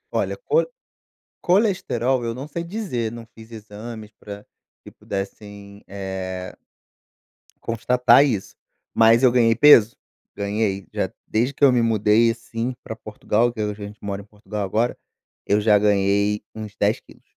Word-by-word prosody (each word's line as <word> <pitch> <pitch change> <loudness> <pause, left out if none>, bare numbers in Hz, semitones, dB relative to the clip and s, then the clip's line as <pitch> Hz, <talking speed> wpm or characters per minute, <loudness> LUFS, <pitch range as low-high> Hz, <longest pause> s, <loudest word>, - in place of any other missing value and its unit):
Olha, - - -1
cole 475 +3 +2 0.7
colesterol 175 - +1
eu 115 0 -2
não 130 +4 -7
sei 170 +3 -5
dizer, 170 - -3
não 115 0 -9
fiz 110 +1 -14
exames 110 0 -9
pra 100 0 -10 0.4
que - - -12
pudessem, 100 +1 -8
eh 95 -2 -6 1.1
constatar 125 +4 +4
isso, 110 -9 -3 0.4
mas 115 +2 +5
eu 125 - +6
ganhei 115 -2 +3
peso. 120 -5 +6 0.4
Ganhei, 100 -1 -2
já - - -1 0.2
desde 120 +5 0
que 145 - -5
eu 135 - +8
me 120 -1 +2
mudei, 110 0 +3
assim, 115 +2 -5
pra 110 - -7
Portugal, 110 +2 -1
que 110 - -5
a 105 0 -1
gente 105 0 -9
mora 100 0 -4
em - - -16
Portugal 105 0 -6
agora, 115 +5 -1 0.5
eu 105 +1 +2
já 105 -1 +5
ganhei 100 0 +2
uns 105 -1 -8
10 105 +1 +1
quilos. - - -20
110 Hz, 150 wpm, -22 LUFS, 105-120 Hz, 1.1 s, eu